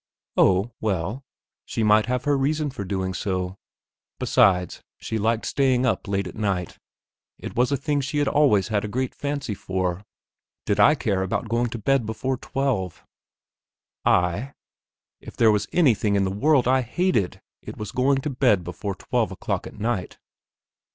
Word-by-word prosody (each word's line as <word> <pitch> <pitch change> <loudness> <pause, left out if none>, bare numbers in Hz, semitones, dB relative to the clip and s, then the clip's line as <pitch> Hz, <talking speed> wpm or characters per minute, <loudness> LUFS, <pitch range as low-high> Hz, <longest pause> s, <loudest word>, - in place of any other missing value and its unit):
Oh, 95 +5 +3
well, 105 +5 -2 0.4
she 115 - -3
might 105 0 +4
have 125 0 -1
her 145 -1 +2
reason 145 +2 0
for 125 -6 -5
doing 95 -1 -2
so; 95 -1 -3 0.6
besides, 90 -2 +2 0.2
she 110 - -4
liked 115 +2 0
staying 130 -2 +2
up 115 - 0
late 100 -1 -1
at 90 - -7
night; 95 -5 -2 0.6
it - - -8
was 125 +3 +2
a 140 - +2
thing 145 +1 -1
she 145 +3 -3
had 145 -1 +2
always 125 -10 +3
had 105 -2 0
a - - -2
great 130 +4 -2
fancy 140 -6 -3
for. 95 -1 -3 0.6
Did 100 - 0
I 150 - +6
care 105 -9 -1
about 95 +4 -2
going 120 +1 +1
to 115 - -5
bed 120 +1 +1
before 130 +4 -2
twelve? 125 -12 -2 1.0
I? 95 +10 +1 0.6
If - - -12
there 115 -2 +5
was 105 -1 0
anything 115 - +3
in 100 - +2
the 95 - -1
world 130 +5 +3
I 130 +1 +4
hated 125 - 0 0.2
it - - -9
was 105 -2 -5
to - - -14
go 135 +2 +3
to 135 +2 -2
bed 125 -8 +2
before 95 +3 -5
twelve - - -1
o'clock - - -3
at - - -12
night. 105 -4 -2
110 Hz, 170 wpm, -24 LUFS, 95-135 Hz, 1.0 s, I